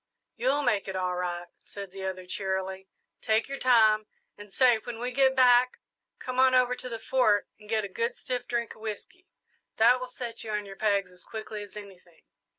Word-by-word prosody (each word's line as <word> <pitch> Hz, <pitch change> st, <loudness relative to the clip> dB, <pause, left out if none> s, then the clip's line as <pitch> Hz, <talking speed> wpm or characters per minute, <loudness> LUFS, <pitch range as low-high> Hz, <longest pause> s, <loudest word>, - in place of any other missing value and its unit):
"You'll 275 Hz, +4 st, +1 dB
make 205 Hz, -7 st, +1 dB
it 190 Hz, -, -4 dB
all 180 Hz, -1 st, -1 dB
right," 175 Hz, -1 st, -3 dB
said 200 Hz, -2 st, -9 dB
the 190 Hz, 0 st, -7 dB
other, 185 Hz, -1 st, -4 dB
cheerily; 190 Hz, 0 st, -3 dB, 0.3 s
"take 220 Hz, +1 st, +1 dB
your 275 Hz, 0 st, -5 dB
time. 220 Hz, -4 st, +4 dB, 0.3 s
And 205 Hz, -1 st, -12 dB
say, 245 Hz, 0 st, +4 dB
when 235 Hz, +1 st, -7 dB
we 245 Hz, +2 st, -3 dB
get 265 Hz, +1 st, +3 dB
back, 250 Hz, -1 st, +5 dB, 0.4 s
come 255 Hz, 0 st, -4 dB
on 260 Hz, 0 st, +5 dB
over 250 Hz, 0 st, +3 dB
to 250 Hz, -, -5 dB
the 230 Hz, -, -4 dB
Fort 220 Hz, -3 st, +2 dB
and 210 Hz, -1 st, -16 dB
get 220 Hz, -1 st, +1 dB
a -, -, -4 dB
good 230 Hz, +5 st, -2 dB
stiff 250 Hz, -1 st, -4 dB
drink 235 Hz, -1 st, -2 dB
of 220 Hz, -, -18 dB
whisky 225 Hz, -, -7 dB, 0.5 s
that 240 Hz, +3 st, +5 dB
will 255 Hz, -, -5 dB
set 240 Hz, -2 st, -6 dB
you 225 Hz, -, -7 dB
on 210 Hz, -1 st, -2 dB
your 195 Hz, -1 st, -9 dB
pegs 200 Hz, -3 st, +1 dB
as 180 Hz, 0 st, -12 dB
quickly 215 Hz, -1 st, -7 dB
as 205 Hz, 0 st, -10 dB
anything." 185 Hz, -5 st, -13 dB
220 Hz, 205 wpm, -28 LUFS, 195-250 Hz, 0.5 s, back